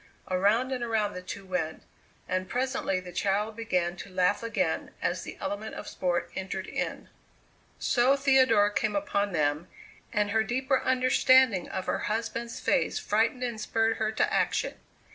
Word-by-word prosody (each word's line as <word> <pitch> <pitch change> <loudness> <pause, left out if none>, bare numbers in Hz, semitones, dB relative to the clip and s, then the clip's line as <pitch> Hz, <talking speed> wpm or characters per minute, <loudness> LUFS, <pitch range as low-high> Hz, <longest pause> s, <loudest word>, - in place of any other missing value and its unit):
Around 210 +8 +2
and 250 -2 -2
around 220 -3 0
the 180 - -6
two 195 +2 -7
went, 180 -4 -3 0.4
and 185 0 -2
presently 250 -7 -1
the 180 -1 -9
child 205 +4 0
began 180 -6 -1
to 200 - -8
laugh 185 +1 +1
again 230 0 -1
as - - -1
the - - -8
element 215 +2 -4
of - - -7
sport 180 -2 -1
entered 190 0 -4
in. - - -4 0.7
So 255 +3 +3
Theodora 260 -7 +4
came 205 +2 0
upon 200 0 0
them, 150 0 0 0.4
and 210 -1 +1
her 220 +1 +3
deeper 260 +3 0
understanding 255 -5 +4
of 190 - -4
her - - -1
husband's 230 +2 -3
face - - +1
frightened 225 +4 +1
and 235 -3 -3
spurred 225 +1 +1
her 215 -1 0
to - - +1
action. - - +1
210 Hz, 160 wpm, -28 LUFS, 185-240 Hz, 0.7 s, Theodora